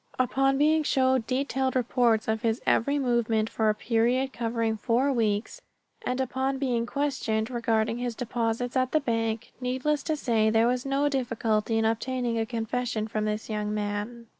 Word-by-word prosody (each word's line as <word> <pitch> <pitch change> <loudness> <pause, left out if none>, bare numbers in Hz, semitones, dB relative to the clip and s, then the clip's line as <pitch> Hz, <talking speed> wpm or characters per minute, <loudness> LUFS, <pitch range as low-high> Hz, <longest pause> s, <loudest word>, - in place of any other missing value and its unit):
Upon 270 +1 +2
being 310 +2 +4
shown 260 -4 +2
detailed 265 0 -1
reports 240 -3 +2
of 220 0 0
his 230 -1 0
every 280 +5 +2
movement 235 -4 +1
for 220 -1 +1
a 210 - +2
period 245 +4 +1
covering 230 -1 -1
four 255 +5 +1
weeks, 220 - -1 0.4
and 255 -8 -2
upon 265 +1 -1
being 245 -4 -1
questioned 260 -6 -1
regarding 230 -1 0
his 245 -2 -3
deposits 235 +1 -2
at 255 -1 +1
the 310 - +4
bank, 225 -3 -2
needless 260 +4 0
to 315 - -1
say 225 -6 +1
there 225 +1 +3
was 250 +2 0
no 275 +1 +1
difficulty 225 -5 0
in 225 - +2
obtaining 235 +1 -1
a 225 - -1
confession 230 -1 -2
from 215 0 -2
this 215 0 -2
young 210 -1 -2
man. 210 +3 -3
235 Hz, 165 wpm, -27 LUFS, 225-260 Hz, 0.4 s, being